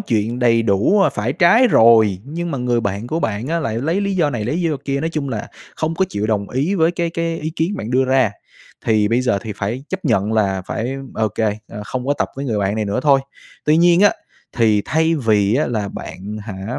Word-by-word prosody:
chuyện 115 +1 -1
đầy 115 -2 +3
đủ, 110 - +2
ơ, - - +3
phải 110 +5 -2
trái 230 - +5
rồi, 110 - +5
nhưng 170 +4 -4
mà 140 - -3
người 125 -1 0
bạn 100 +2 -3
của 160 +6 -2
bạn 110 +2 -2
á 170 0 0
lại 115 -6 -2
lấy 165 +9 0
lý 200 -1 -1
do 155 -5 +2
này, 115 -5 -3
lấy 130 +9 -1
lý 180 - -1
do 160 -4 0
kia, 140 0 -1
nói 160 +1 -2
chung 145 -3 -2
là, - - -4 0.3
không 160 +1 -1
có 190 +3 +2
chịu 105 - -2
đồng 105 -2 -1
ý 145 +10 0
với 165 -2 +3
cái 170 -1 -2
cái 165 0 -2
ý 155 +1 -3
kiến 180 +6 -1
bạn 115 - -5
đưa 130 +1 +3
ra. 130 -5 +2 0.5
Thì 110 -2 +3
bây 115 +3 +2
giờ 125 -6 +1
thì 110 - -5
phải 115 +7 -3
chấp 190 -1 -5
nhận 110 -5 +1
là 95 -4 +1
phải 120 +4 -3 0.2
ô 110 -1 0
kê, 105 +1 -1
ơ, 105 - -7
không 125 +3 -5
có 145 - +2
tập - - -1
với 140 - -4
người 115 -6 -1
bạn 100 +1 0
này 110 - -1
nữa 100 +5 -1
thôi. 140 -2 +4 0.4
Tuy 150 +1 +4
nhiên 175 +1 +5
á, 205 - +6 0.4
thì 110 -3 +3
thay 160 +1 +1
vì 110 -6 +2
á 150 +4 +1
là 110 -4 -2
bạn 100 +3 -7
hả, 105 +2 -6
125 Hz, 250 wpm, -19 LUFS, 105-160 Hz, 0.5 s, á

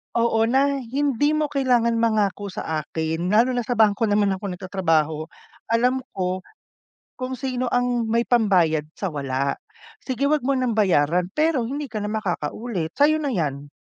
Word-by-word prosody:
Oo 235 -1 +2
na, 275 +3 +2
hindi 280 +3 0
mo 305 -1 +1
kailangan 245 -4 +2
mangako 210 -3 +1
sa 160 -3 -3
akin, 160 +3 -3
lalo 230 +4 +4
na 245 - 0
sa 245 - 0
bangko 215 +1 +4
naman 205 -1 +2
ako 200 -1 -4
nagtatrabaho. 165 -5 0 0.5
Alam 250 +3 +2 0.2
ko, 185 0 -1 0.8
kung 255 -1 -4
sino 255 0 -2
ang 245 -1 +1
may 230 +1 +2
pambayad, 180 -10 +3
sa 195 - -2
wala. 140 -1 -1 0.5
Sige, 265 +1 0
'wag 305 -1 +2
mo 275 - +2
ng 255 -2 0
bayaran 180 -3 +2
pero 305 -3 +1
hindi 285 +2 -4
ka 215 - -4
na - - -2
makakaulit, 190 -2 -3
sa'yo 295 +3 +4
na 290 -2 -1
'yan. 145 - -2
225 Hz, 160 wpm, -23 LUFS, 180-255 Hz, 0.8 s, lalo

